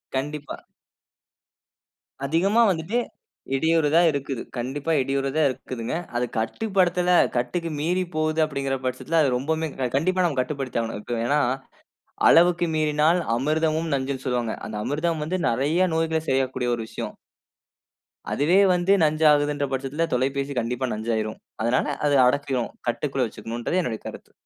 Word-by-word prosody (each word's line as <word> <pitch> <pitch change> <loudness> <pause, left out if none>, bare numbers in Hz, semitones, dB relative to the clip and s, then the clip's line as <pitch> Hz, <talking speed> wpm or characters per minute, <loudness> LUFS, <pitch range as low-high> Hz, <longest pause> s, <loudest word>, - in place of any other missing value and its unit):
கண்டிப்பா. 145 +2 -4 1.7
அதிகமா 190 +10 +2
வந்துட்டு 180 +6 -1 0.6
இடியுறதா 160 +2 +3
இருக்குது. 140 -3 -3 0.2
கண்டிப்பா, 135 +6 -3
இடியுறு 135 +1 -1
தான் 155 -3 +4
இருக்குதுங்க. 125 0 -5 0.2
அது 125 +1 +1
கட்டுப்படுத்தல 180 - +1 0.3
கட்டுக்கு 165 +8 -1
மீறி 180 +4 0
போது 155 0 0
அப்டிங்குற 135 -2 -2
பட்சத்தில 130 +6 0
அது 140 - +3
ரொம்பமே 160 +4 -1 0.3
கண்டிப்பா 185 +4 +1
நம்ம 145 -6 0
கட்டுப்படுத்தி 130 -2 -3
ஆவணும். 115 -2 -4
இப்ப 120 +1 -4
ஏனா, 145 +3 +2 0.9
"அளவுக்கு 175 0 +5
மீறினால் 155 +3 +2 0.2
அமிர்தமும் 155 +3 0
நஞ்சுன்னு" 130 0 -3
சொல்வாங்க. 120 -3 -1
அந்த 105 - -5
அமிர்தம் 155 +3 -1
வந்து 185 +3 -2
நறைய 150 +10 +2
நோய்கள 160 -1 0
சரியாகக்கூடிய 130 -2 0
ஒரு 115 - -5
விஷயம். - - -6 1.2
அதுவே 165 +7 +3 0.2
வந்து 180 +2 +1
நஞ்சாகுறதுன்ற 150 -2 +3
பட்சத்தில 135 +5 -1
தொலைபேசி 135 +2 0
கண்டிப்பா 125 +2 -2
நஞ்சு 110 +2 -3
ஆயிரும். 110 0 -3 0.2
அதனால 120 +5 +1 0.2
அது 145 - +3
அடக்கிரும். 135 -2 0 0.2
கட்டுக்குள்ள 135 0 -1
வச்சுக்கணுன்றது 120 - -3
என்னுடைய 115 -9 -4
கருத்து. - - -10
145 Hz, 130 wpm, -24 LUFS, 130-165 Hz, 1.7 s, அளவுக்கு